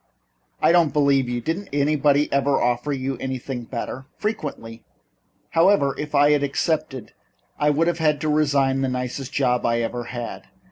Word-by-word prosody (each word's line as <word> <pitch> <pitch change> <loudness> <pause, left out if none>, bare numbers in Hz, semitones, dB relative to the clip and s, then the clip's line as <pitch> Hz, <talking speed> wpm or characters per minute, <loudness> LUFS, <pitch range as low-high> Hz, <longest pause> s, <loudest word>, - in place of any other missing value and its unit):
"I - - +6
don't 170 -4 +3
believe 140 -3 +2
you. 120 0 -2
Didn't 175 - -3
anybody 145 0 +2
ever 140 0 +2
offer 120 +4 0
you 135 -2 -3
something 130 -2 -4
better?" 130 +2 -6
"Frequently. 140 - -5 0.7
However, 165 -5 +3
if 150 0 -5
I 145 +1 +5
had 145 -1 +3
accepted 140 -2 -2 0.5
I 150 - +3
would 150 +3 +2
have 170 -1 -1
had 150 -2 +2
to 155 - -1
resign 140 -3 +2
the 135 - 0
nicest 125 +1 -4
job 125 -3 +1
I 115 0 +1
ever 120 +1 -3
had. 120 -1 -7
140 Hz, 160 wpm, -23 LUFS, 125-150 Hz, 0.7 s, I